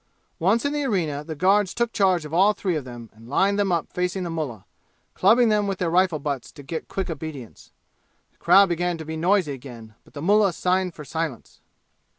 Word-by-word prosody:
Once 205 - +2
in 285 - 0
the 295 -1 -1
arena, 165 - -1
the 160 +1 -6
guards 190 +4 +2
took 235 -1 -1
charge 185 -6 +2
of 150 - -9
all 195 +5 +4
three 185 -4 -2
of 150 - -3
them 120 -2 -10
and 115 +2 -16
lined 200 +8 +2
them 200 -2 +1
up 170 -3 0
facing 180 +1 -2
the 170 - -4
mullah, 140 - -5 0.5
clubbing 225 +5 +4
them 210 -1 +2
with 195 -1 -2
their 170 -2 -1
rifle 180 -2 +3
butts 140 -3 -4
to 145 - -13
get 160 +4 -5
quick 195 - -3
obedience. 155 - -8 0.6
The - - -39
crowd 195 -1 +6
began 175 0 -1
to 160 - -8
be 160 +1 -5
noisy 175 0 +1
again, 120 -4 -11
but - - -23
the 145 - -6
mullah 200 0 +3
signed 180 0 0
for 150 - -9
silence. 160 -5 -5
175 Hz, 210 wpm, -24 LUFS, 150-195 Hz, 0.6 s, crowd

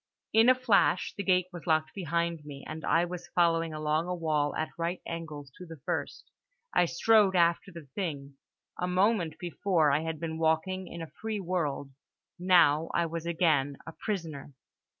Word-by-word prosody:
In 225 +2 +6
a 255 - +7
flash 225 -7 +2
the - - -3
gate 185 -2 +2
was 175 -1 -9
locked 155 -1 +1
behind 170 -3 -2
me, 140 -2 -9
and 155 +1 -7
I 170 +1 +3
was 175 0 -7
following 165 -2 +2
along 155 +2 -1
a 180 - -2
wall 155 -3 0
at 155 - -2
right 170 +2 -2
angles 155 -4 -6
to 180 - -8
the 165 0 -9
first. - - -4 0.4
I 175 - +4
strode 200 +3 +3
after 170 +2 +2
the 170 -3 -10
thing. 140 -7 -4 0.4
A 180 - -1
moment 180 -2 +1
before 175 -3 +1
I 140 - +3
had 160 -1 -4
been 160 0 -4
walking 165 +4 0
in 170 -1 -7
a 160 - -10
free 220 -1 -2
world: 165 -7 -2 0.5
now 170 -4 +4
I 170 - +2
was 165 0 -5
again 155 -5 +1
a - - -7
prisoner. 160 -8 -5
170 Hz, 175 wpm, -29 LUFS, 155-180 Hz, 0.5 s, a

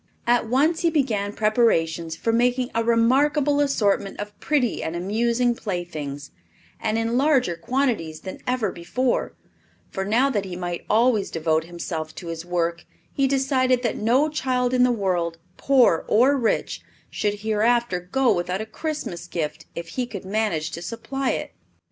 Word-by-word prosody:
At 240 -1 +2
once 300 +7 +2
he 340 - +3
began 230 -10 0
preparations 170 -8 +1
for 225 +7 -1
making 245 +2 +1
a 230 - +1
remarkable 275 +5 +3
assortment 205 -8 +1
of 205 0 -6
pretty 280 -6 0
and 160 - -3
amusing 235 +7 +1
playthings, 160 -9 -5 0.5
and 220 0 -1
in 225 +1 0
larger 265 - +2
quantities 205 - -1
than 190 - -7
ever 250 -6 0
before; 245 +10 -1 0.6
for 190 - -3
now 240 +8 +2
that 205 -6 0
he 185 -2 -6
might 175 -1 -4
always 225 -2 +3
devote 160 -1 0
himself 165 -2 -5
to 180 - -8
this 165 -1 -5
work 170 -1 -1 0.3
he 275 -1 +2
decided 260 -2 +2
that 235 - 0
no 250 +8 +2
child 255 -4 0
in 250 - +3
the 250 0 +5
world, 180 -6 -1 0.2
poor 255 -11 +4
or 255 +6 +4
rich, 240 -5 -1 0.3
should 205 -1 -2
hereafter 220 -1 +1
go 245 +9 +1
without 180 +1 -2
a 220 - -3
Christmas 295 - -5
gift 155 -2 -4
if 170 0 -6
he 250 +4 -3
could 200 -5 -7
manage 190 -6 -1
to 170 - -6
supply 270 +7 -3
it. - - -4
220 Hz, 160 wpm, -24 LUFS, 175-255 Hz, 0.6 s, the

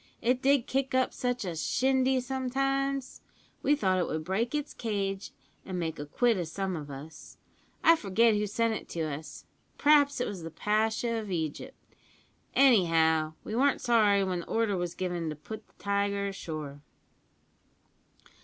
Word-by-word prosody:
It 250 +2 +1
did 275 -2 +3
kick 270 0 -1
up 260 0 +2
such 245 -3 -2
a 175 -2 -3
shindy 260 +9 +2
sometimes! 270 +1 -1 0.4
We 295 - +3
thought 185 -10 +1
it 175 - 0
would 155 0 -3
break 220 - -1
its 295 0 -3
cage 200 -4 -3 0.3
an 185 -1 -5
make 165 -3 -3
a 145 - -5
quid 230 +6 +2
o' - - 0
some 190 +3 -3
of 150 -3 -6
us. 140 +3 -10 0.5
I 330 - +7
forget 225 - +3
who 210 0 0
sent 230 +2 0
it - - -6
to 170 - -4
us 155 0 -5 0.3
p'raps 285 -2 +4
it 250 - 0
was 195 -4 -5
the 165 - -6
Pasha 220 +5 0
of 215 -2 -7
Egypt; 170 - -4 0.8
anyhow 165 - +4
we 215 - -5
weren't 275 +3 +3
sorry 210 -5 +3
when 185 -2 -1
the 170 - -8
order 225 -3 +1
was 175 -1 -3
given 175 -3 -2
to 155 - -4
put 215 +9 -9
the - - -30
tiger 200 0 0
ashore. 155 -7 -6
205 Hz, 165 wpm, -29 LUFS, 170-255 Hz, 0.8 s, I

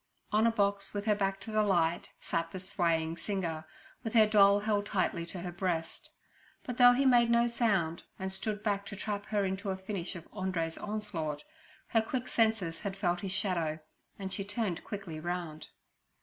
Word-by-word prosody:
On 215 +2 +4
a - - +4
box, 200 -2 0
with 205 0 -2
her 215 - +4
back 195 -1 0
to 225 - -7
the 215 0 +3
light, 175 -4 +2
sat 165 -1 -2
the 190 - -6
swaying 170 -4 0
singer, 170 -4 -3 0.4
with 225 -1 -4
her 220 -1 +8
doll 205 -1 +6
held 205 -1 0
tightly 185 -4 0
to 175 +1 -6
her 175 0 -4
breast. 175 -3 -3 0.5
But 250 -1 -5
though 245 -1 +9
he 270 +3 +2
made 240 -2 +6
no 235 0 +5
sound 200 -9 +1 0.2
and 190 0 -3
stood 205 +2 -3
back 200 -2 0
to 205 - -6
trap 205 0 -3
her 205 -2 +1
into 190 +2 -2
a 190 - -1
finish 190 -1 -4
of 170 -1 -9
Andrew's 185 -5 -2
onslaught, 180 -9 -3 0.5
her 225 - +4
quick 245 +3 -3
senses 220 -8 +1
had 195 -2 -4
felt 175 -3 +1
his 195 - -3
shadow, 180 -5 0 0.4
and 190 -1 -5
she 195 - -1
turned 205 -3 -2
quickly 195 -7 -6
round. 170 -2 -4
195 Hz, 190 wpm, -31 LUFS, 175-210 Hz, 0.5 s, though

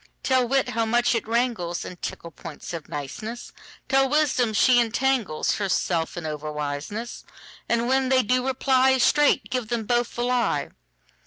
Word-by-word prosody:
Tell 255 -2 +2
wit 270 +2 +1
how 230 +1 0
much 240 +2 +2
it 230 - -1
wranglesIn 220 -7 -2
tickle 170 - -6
points 150 +3 -9
of 165 -2 -7
niceness; 170 - -6 0.4
Tell 270 -1 +3
wisdom 275 -5 +2
she 245 +4 +4
entanglesHerself 210 -8 0
in 170 - -5
over 150 0 -4
wiseness:And 205 +9 -5
when 265 0 +2
they 260 -1 +4
do 255 +3 +1
reply, 265 0 +3
Straight 275 -3 +3
give 250 -3 -2
them 235 0 -2
both 240 +1 0
the 240 - -1
lie. 250 0 0
235 Hz, 145 wpm, -24 LUFS, 175-255 Hz, 0.4 s, she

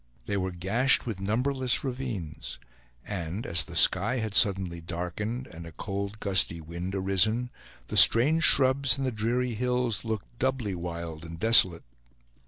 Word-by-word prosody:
They 100 - -3
were 95 -1 -2
gashed 100 +10 0
with 110 -6 -5
numberless 125 +5 -1
ravines; 105 - -6 0.5
and 90 +1 -6
as 85 -2 +1
the - - -12
sky 125 +5 +4
had 110 -3 -4
suddenly 95 -4 +1
darkened, 90 +9 -5
and 85 -5 -12
a - - -11
cold 100 +4 -6
gusty 95 -4 +2
wind 85 +4 -7
arisen, 100 +6 0 0.4
the - - -6
strange 150 +8 +7
shrubs 130 -2 +4
and 135 - -3
the 130 - -2
dreary 120 +3 -2
hills 125 -1 -2
looked 110 +1 -6
doubly 130 -6 -2
wild 85 -2 -7
and 85 0 -10
desolate. 95 -5 +4
105 Hz, 150 wpm, -26 LUFS, 90-125 Hz, 0.5 s, strange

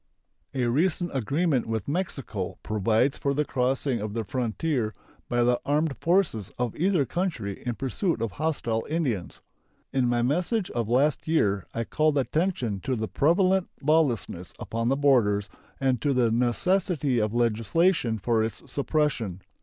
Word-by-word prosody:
A 130 -2 +1
recent 170 +8 +1
agreement 140 - 0
with 110 -3 -2
Mexico 140 - -3
provides 110 +6 +1
for 140 0 0
the 150 +1 +1
crossing 130 -1 0
of 105 0 -4
the 115 - -1
frontier 120 +1 -1 0.3
by 120 0 +2
the 120 0 +2
armed 150 +1 +1
forces 170 - +1
of 120 -3 -2
either 175 -3 +2
country 130 - -3
in 120 - -1
pursuit 140 - -1
of 115 -2 -2
hostile 120 - -1
Indians. 135 - -2 0.5
In 130 -2 +2
my 120 0 +1
message 180 - 0
of 115 -2 -2
last 140 +7 +2
year 100 - +1
I 115 - 0
called 155 +4 +1
attention 135 - 0
to 130 +7 -2
the 110 -1 -2
prevalent 185 - +2
lawlessness 135 - +1
upon 115 +1 -2
the 135 - +2
borders 110 -8 +3 0.3
and 130 -4 +1
to 145 - +2
the 120 -3 +3
necessity 135 +3 +1
of 110 +1 -1
legislation 120 - +2
for 110 +1 +1
its 110 - -4
suppression. 135 - -1
130 Hz, 150 wpm, -26 LUFS, 115-155 Hz, 0.5 s, borders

